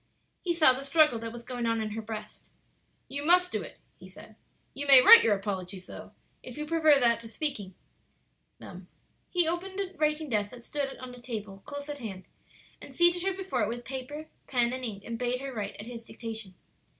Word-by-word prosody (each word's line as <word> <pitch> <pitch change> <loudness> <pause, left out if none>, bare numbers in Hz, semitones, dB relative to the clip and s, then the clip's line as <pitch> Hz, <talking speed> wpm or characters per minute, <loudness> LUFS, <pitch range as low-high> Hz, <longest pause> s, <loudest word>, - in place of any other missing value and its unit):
He 345 -2 -1
saw 310 -6 +6
the 265 +2 -6
struggle 280 -4 +4
that 225 0 -6
was 235 0 -9
going 245 -1 -3
on 230 0 +1
in 215 -1 -3
her 225 +1 -4
breast. 215 -1 -8 0.6
"You 280 +2 -5
must 360 +3 +4
do - - -2
it," - - -10 0.2
he - - -12
said; - - -14 0.4
"you 285 +1 -5
may 270 -2 +10
write 455 - +10
your 215 -2 +3
apologies, 190 -2 -5
though, - - -11 0.3
if - - -10
you 300 - -3
prefer 310 -2 +4
that 235 -2 +3
to 230 - -9
speaking 220 - -4 0.8
them." - - -11 0.4
He 350 -3 +2
opened 375 +3 -3
a 385 -1 -3
writing 305 0 0
desk 210 -5 0
that 245 +1 -12
stood 275 +1 -4
on 255 -1 -9
a 245 - -13
table 210 -5 -6
close 285 0 -6
at 290 -1 -6
hand, 195 -6 -7 0.6
and - - -10
seated 345 0 +3
her 385 +1 0
before 380 -9 -2
it 210 - +1
with 240 +1 -6
paper, 270 +4 -6 0.2
pen, 245 -2 +1
and 255 0 -4
ink, 205 -5 -5
and 230 0 -5
bade 250 0 0
her 270 0 -6
write, 210 -3 -4
at 205 - -7
his 235 -1 -8
dictation. 225 -5 -7
250 Hz, 210 wpm, -29 LUFS, 225-300 Hz, 0.8 s, may